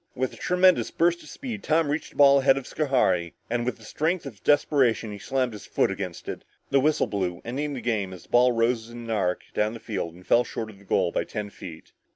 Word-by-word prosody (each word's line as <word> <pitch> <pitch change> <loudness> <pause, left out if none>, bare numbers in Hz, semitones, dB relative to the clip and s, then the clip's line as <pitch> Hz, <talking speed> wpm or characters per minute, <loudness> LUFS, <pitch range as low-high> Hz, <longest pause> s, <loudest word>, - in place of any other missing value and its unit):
With 130 0 -1
a - - -10
tremendous 180 0 +3
burst 170 +1 +1
of - - -13
speed, 235 -7 -6
Tom 160 -2 +2
reached 150 +2 -2
the - - -22
ball 140 -1 +7
ahead 135 0 +4
of 135 - -4
Schohari, 95 - +1 0.2
and 120 0 0
with 125 - -1
the 110 - -17
strength 160 +9 -1
of 115 -8 -10
desperation, 130 -7 +2
he 100 - -7
slammed 130 +1 -1
his 105 - -10
foot - - +1
against - - -6
it. - - -5 0.3
The 135 - +5
whistle 150 +3 +2
blew 90 -4 -2
ending 145 +5 -3
the 125 - -5
game 105 -5 -1
as 90 -3 -10
the - - -23
ball 125 +1 +5
rose 115 -1 0
in 120 - -10
an 115 - -5
arc 95 -5 0
down 105 +2 0
the - - -8
field 95 -7 -4
and 90 +1 -16
fell 120 - +4
short 110 -1 -5
of 100 - -17
the 100 - -19
goal 90 -3 +1
by - - 0
ten 105 -2 -5
feet. 80 -4 -11
120 Hz, 245 wpm, -26 LUFS, 105-145 Hz, 0.3 s, ball